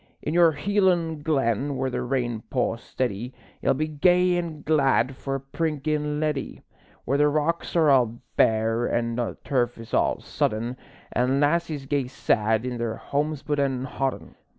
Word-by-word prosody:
In 150 - -2
your 170 -2 +5
Hielan' 175 -2 +1
glen, 140 -3 0
where 130 0 -1
the - - -2
rain 120 -3 -1
pours 120 -2 -1
steady, 125 0 -3 0.3
Ye'll - - +2
be 155 +3 -1
gay 180 +4 +3
an' 165 -4 -4
glad 135 -4 +2
for 135 +1 -4
a - - -2
prinkin' 150 +1 -2
leddie; 150 -3 -2 0.4
Where 140 +3 +1
the 150 - +5
rocks 155 +4 -1
are 160 -4 +5
all 120 -3 +3 0.2
bare 115 +1 +2
an' 115 0 0
the 115 -7 -2
turf 125 -3 0
is 115 -1 -11
all - - +2
sodden, 115 +3 -2 0.4
An' 130 +2 +1
lassies 150 -1 +1
gae 140 -2 0
sad 110 -3 +1
in 125 -2 -3
their 115 -1 -2
homespun 145 +1 -2
an' 135 -2 0
hodden. 135 0 -3
135 Hz, 160 wpm, -25 LUFS, 120-155 Hz, 0.4 s, your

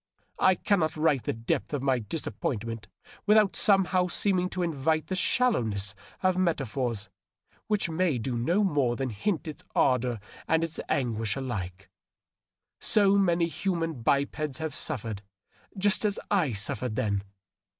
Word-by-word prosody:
I 185 0 +5
cannot 170 -4 0
write 155 -3 +3
of - - -20
the - - 0
depth 115 +6 -2
of 135 - -3
my 130 -2 +2
disap 110 0 -4
pointment 115 -2 -3 0.4
without 210 -2 +5
somehow 190 -2 +4
seeming 185 0 +1
to 185 -1 -2
invite 155 -1 0
the 185 - -3
shallowness 115 - +1 0.3
of 185 0 +2
meta 170 -6 +1
phors 115 -4 -3 0.6
which 210 -4 +1
may 165 -3 0
do 120 +2 -3
no 170 - +1
more 145 -10 +1
than 135 +1 -2
hint 160 - -2
its 155 - -6
ardor 125 -3 +2 0.3
and 160 0 +2
its 165 -1 -2
anguish 115 -7 0
alike. 100 -8 -5 0.9
So 200 -2 +4
many 175 -3 +3
human 165 -3 -2
bipeds 140 +3 0
have 160 -2 -4
suffered 110 -7 -3 0.6
just 205 +3 +3
as 210 -1 +1
I 175 - +2
suffered 110 +3 -2
then 105 -5 0
150 Hz, 150 wpm, -28 LUFS, 120-185 Hz, 0.9 s, I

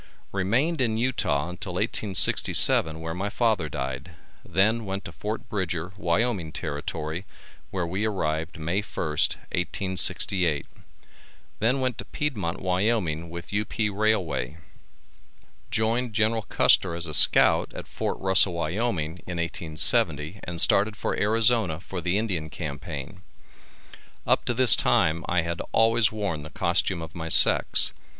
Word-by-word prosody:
Remained 125 - 0
in 110 -3 +1
Utah 115 - -1
until 90 +1 -5
1867, 90 -5 +4
where 80 0 -5
my 95 +4 -4
father 105 -8 0
died, 65 +2 -6 0.3
then 110 +6 +1
went 95 -1 -5
to - - -7
Fort 110 +2 -6
Bridger, 90 -3 -4
Wyoming 95 -2 -1
Territory, 75 +2 -5 0.5
where 90 -3 -3
we 95 +5 -3
arrived 80 -5 -3
May 85 +6 -2
1, 105 - -16
1868, 90 +1 0 0.9
then 125 +5 +1
went 130 -2 -2
to - - -6
Piedmont, 100 - -4
Wyoming, 90 -4 -1
with 85 +3 -9
U.P. 105 +1 -2
Railway. 95 - -1 1.1
Joined 115 +2 -1
General 110 +1 +1
Custer 85 -3 +3
as 85 0 -3
a 75 - -6
scout - - +5
at - - -7
Fort - - -4
Russell, 95 -1 +2
Wyoming, 85 -1 -3
in 90 -1 -5
1870, 80 0 +1
and 85 -2 -6
started 105 +5 +2
for - - -3
Arizona 110 -5 +1
for 95 0 -7
the 90 +3 -1
Indian 90 -8 -3
Campaign. 75 +3 -7 1.0
Up - - +1
to 120 - -2
this 125 -2 +7
time 80 +1 +1
I 85 -2 0
had 85 0 -4
always 115 0 +3
worn 100 -8 -4
the 75 - -10
costume 85 +1 0
of 80 +1 -10
my 80 -2 -6
sex. - - +6
95 Hz, 135 wpm, -25 LUFS, 80-110 Hz, 1.1 s, this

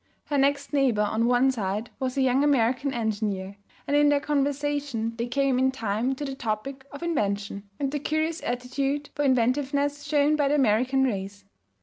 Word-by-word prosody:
Her 290 - -1
next 280 +2 +1
neighbor 255 -7 +3
on 220 +3 +1
one 250 +2 +4
side 210 -1 -3
was 260 0 -2
a 270 - +3
young 260 +2 +3
American 270 -1 +2
engineer, 205 -5 -2 0.3
and 285 - 0
in 290 0 +5
their 290 -1 +3
conversation 285 -4 -1
they 235 +1 -2
came 270 0 +1
in 260 0 +3
time 235 0 -1
to 290 - -5
the 270 - -4
topic 265 +3 -4
of 285 +4 -8
invention 200 -10 -2
and 275 -2 -1
the 295 - -2
curious 315 +3 -1
aptitude 270 +4 -2
for 290 - -1
inventiveness 280 +3 +1
shown 295 0 +2
by 290 -2 +2
the 290 - +2
American 260 +1 +2
race. 200 -4 -3
265 Hz, 180 wpm, -26 LUFS, 230-285 Hz, 0.3 s, in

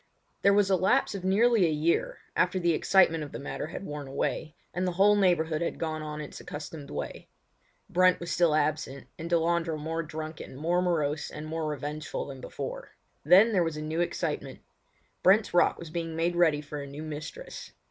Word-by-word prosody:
There 200 - +5
was 200 -1 +3
a - - +6
lapse 190 +10 +2
of 195 -2 -5
nearly 205 +1 +4
a - - 0
year, 155 +2 0
after 180 +1 +2
the 175 -2 +2
excitement 165 -2 +4
of 145 - -8
the - - -4
matter 145 - -5
had 175 +4 -7
worn 145 -3 -6
away, 150 +3 -2 0.2
and 180 +1 -1
the 180 - -1
whole 200 +3 +5
neighbourhood 170 -5 +2
had 170 - -2
gone 155 -1 -3
on 150 0 -5
its 150 - -8
accustomed 150 -1 -8
way. - - -6 0.6
Brent 185 0 +4
was 170 0 -5
still 170 -3 +3
absent, 150 -2 -1
and 165 +1 -5
Delandre 170 -1 +1
more 160 +2 -3
drunken, 155 -3 -7
more 170 +6 +1
morose, 155 -4 0
and 150 0 -7
more 160 0 -3
revengeful 150 +1 -4
than 135 -2 -9
before. - - -6 0.3
Then 205 +6 +7
there 180 -3 +4
was 165 -2 -2
a - - -4
new 160 +2 -1
excitement. 175 - -3 0.6
Brent's 200 +2 +4
Rock 175 - +4
was 170 -2 -9
being 165 -1 -3
made 170 +2 0
ready 160 -4 +3
for 145 0 -6
a 140 - -7
new 145 +3 -7
mistress. 155 - -7
165 Hz, 195 wpm, -28 LUFS, 150-180 Hz, 0.6 s, Then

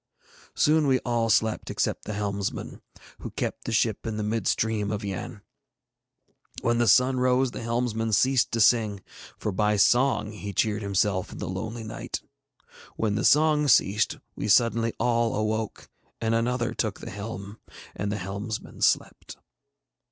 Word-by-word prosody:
Soon 155 0 +3
we 130 -1 +4
all 115 -1 0
slept 110 0 +1
except - - -2
the 105 - -4
helmsman, 100 -1 -3 0.4
who - - -6
kept - - -4
the - - -3
ship 110 0 0
in 110 -1 -3
the 105 - -2
mid 110 0 -1
stream 110 -2 0
of 105 0 -3
Yann. 105 +2 -6 1.2
When 120 0 +2
the 120 - +2
sun 130 +3 +4
rose 130 0 +2
the - - -7
helmsman 115 -1 -1
ceased 130 +4 +3
to 115 - +1
sing, 105 -4 +3 0.3
for 105 - -2
by 105 +2 +1
song 120 +1 +3
he 105 -1 -7
cheered 110 0 0
himself 100 -1 0
in - - -9
the - - -5
lonely 110 +6 -5
night. 110 +1 -5 0.8
When 110 -2 0
the 105 +3 -1
song 150 0 +4
ceased 105 -5 +3 0.2
we - - -4
suddenly 115 +1 +3
all 115 -1 +1
awoke, 110 0 -2 0.3
and 115 0 0
another 120 +1 0
took 110 -4 -2
the 115 - -8
helm, 105 0 -7 0.4
and 100 +1 -2
the 105 - -2
helmsman 100 +3 -6
slept. - - 0
110 Hz, 160 wpm, -26 LUFS, 105-120 Hz, 1.2 s, we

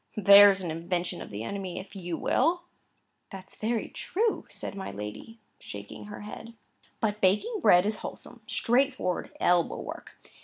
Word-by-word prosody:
There's 200 -1 +8
an 175 -3 -3
invention 175 +2 -3
of - - -8
the 105 +1 -6
enemy, 190 +4 -5
if 190 +2 -11
you 175 -3 -4
will!" 335 +6 +1 0.7
"That's 190 -1 -11
very 225 +1 -1
true!" 440 +4 -1
said - - -5
my 195 -1 -6
lady, 105 - -8 0.2
shaking 100 - -9
her 205 0 -9
head. 220 +2 -9 0.4
"But 210 -1 -1
baking 310 - +2
bread 180 - +6
is 215 +1 0
wholesome, - - -8
straightforward 250 -7 0
elbow 175 -1 +2
work. - - -8
200 Hz, 150 wpm, -28 LUFS, 175-225 Hz, 0.7 s, There's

